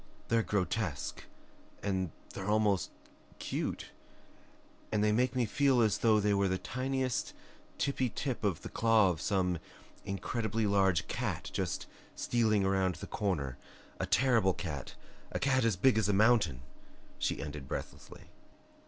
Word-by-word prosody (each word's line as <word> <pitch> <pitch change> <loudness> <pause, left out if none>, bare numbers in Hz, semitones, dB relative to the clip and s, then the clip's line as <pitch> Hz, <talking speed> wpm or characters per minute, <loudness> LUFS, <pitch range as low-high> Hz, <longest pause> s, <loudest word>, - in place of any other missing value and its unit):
"They're 115 0 +4
grotesque 100 -6 -2 0.6
and 95 -3 0 0.2
they're 95 +1 -4
almost 105 -3 +2 0.5
CUTE, - - -3 1.0
and 105 -1 +2
they 105 - +3
make 125 +3 +2
me 125 -2 +2
feel 135 +3 +3
as 110 -3 +2
though 110 -2 +4
they 105 0 +2
were 100 0 +2
the 95 0 0
tiniest 130 +3 -2 0.4
tippy 130 -3 0
tip 130 0 -3
of 100 -6 0
the - - -6
claw 110 -4 +4
of 80 - -5
some 90 -3 +1 0.4
incredibly 110 +2 -2
large 95 -4 +2
cat - - -3
just - - -2 0.3
stealing 110 -4 +2
around 95 -2 +1
the - - -7
corner, 90 - -2 0.4
a - - -1
terrible 115 -8 +3
cat, 75 -7 -5 0.4
a - - -1
cat 130 -1 +2
as 115 -3 +2
big 110 +4 +4
as 105 -2 +1
a - - +3
mountain," 100 - +3 0.6
she - - -1
ended 75 -2 -6
breathlessly. - - -7
105 Hz, 145 wpm, -32 LUFS, 95-115 Hz, 1.0 s, They're